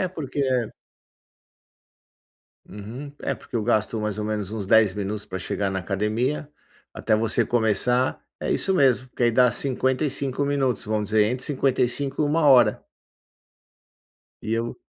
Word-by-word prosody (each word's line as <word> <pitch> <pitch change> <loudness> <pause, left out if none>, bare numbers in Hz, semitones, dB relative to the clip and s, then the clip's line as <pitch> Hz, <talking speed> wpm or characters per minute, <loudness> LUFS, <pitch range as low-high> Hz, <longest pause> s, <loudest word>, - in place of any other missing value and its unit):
É 185 - 0
porque 155 -5 -5 2.3
Uhum, 115 +8 -8
é - - -2
porque - - -16
eu 110 - 0
gasto 110 0 0
mais 105 -1 -3
ou 105 - -2
menos 105 -2 -3
uns 105 -3 -4
10 110 -1 +5
minutos 105 +1 -4
pra 95 - -5
chegar 95 +2 -2
na 95 0 -2
academia, 110 +10 -1 0.5
até 110 - 0
você 110 0 +1
começar, 120 +2 +1 0.2
é - - -2
isso 190 - +1
mesmo, 130 -5 +3
porque 125 - -2
aí 120 - +4
dá 125 +1 +4
55 135 +2 -1
minutos, 135 -6 0
vamos 105 -1 -2
dizer, 110 -1 +4
entre 125 +4 -1
55 135 0 0
e - - +3
1 150 +1 +2
hora. 130 -3 +5 1.6
E 110 - -3
eu 115 +1 -2
120 Hz, 150 wpm, -24 LUFS, 105-135 Hz, 2.3 s, 10